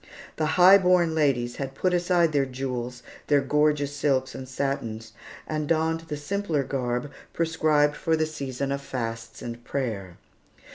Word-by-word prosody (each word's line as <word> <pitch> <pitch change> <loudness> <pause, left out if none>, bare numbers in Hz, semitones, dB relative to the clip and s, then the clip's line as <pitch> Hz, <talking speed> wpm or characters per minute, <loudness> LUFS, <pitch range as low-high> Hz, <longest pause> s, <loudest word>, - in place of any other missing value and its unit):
The 155 - +1
high 185 +2 +9
born 180 -3 +3
ladies 130 -6 +1
had 135 -1 -5
put 185 +4 +1
aside 175 -2 +3
their 140 -2 +1
jewels, 125 -1 -4 0.2
their 145 -1 +4
gorgeous 145 0 +1
silks 135 -2 0
and 130 -1 -8
satins, 115 -5 -3 0.3
and 155 -1 -3
donned 165 0 0
the 150 - -4
simpler 160 -1 -1
garb 125 0 -2 0.2
prescribed 155 -3 +2
for 165 - +1
the 155 - +1
season 140 -3 -4
of 140 0 -2
fasts 115 -4 -5
and 120 0 -7
prayer. 105 -11 -4
140 Hz, 150 wpm, -26 LUFS, 125-155 Hz, 0.3 s, high